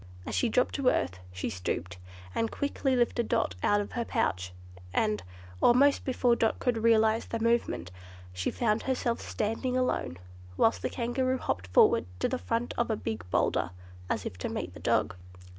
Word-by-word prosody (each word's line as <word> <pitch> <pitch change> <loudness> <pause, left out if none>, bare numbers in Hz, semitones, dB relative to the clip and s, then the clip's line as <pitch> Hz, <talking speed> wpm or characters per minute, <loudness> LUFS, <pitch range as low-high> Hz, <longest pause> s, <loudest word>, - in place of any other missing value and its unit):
As - - -5
she 245 - +2
dropped 250 +3 +2
to 275 -3 -1
earth, 90 +1 -1
she 90 0 -4
stooped, 90 0 -3 0.4
and 225 - 0
quickly 280 -2 -1
lifted 240 -1 +1
Dot - - +1
out 205 - +3
of 205 - -4
her 240 - -1
pouch, 95 - -1 0.4
and, 105 +1 +1 0.4
almost 275 +4 +5
before 250 -2 +2
Dot 225 -1 +1
could 245 -3 0
realize 220 0 +3
the 230 - -3
movement, 230 - 0 0.4
she 90 0 -1
found 220 -2 +1
herself 250 -3 -1
standing 225 +4 -2
alone, 255 - -1 0.4
whilst 225 - +3
the - - -1
Kangaroo 255 +2 0
hopped 90 - -3
forward 90 -1 +4
to - - +1
the 255 - -2
front 230 +1 -2
of 235 - +1
a 220 - +1
big 110 - -4
boulder, - - +1 0.4
as - - -1
if 90 - -6
to - - -3
meet - - -4
the - - -11
dog. 90 - +1
230 Hz, 175 wpm, -29 LUFS, -, 0.4 s, almost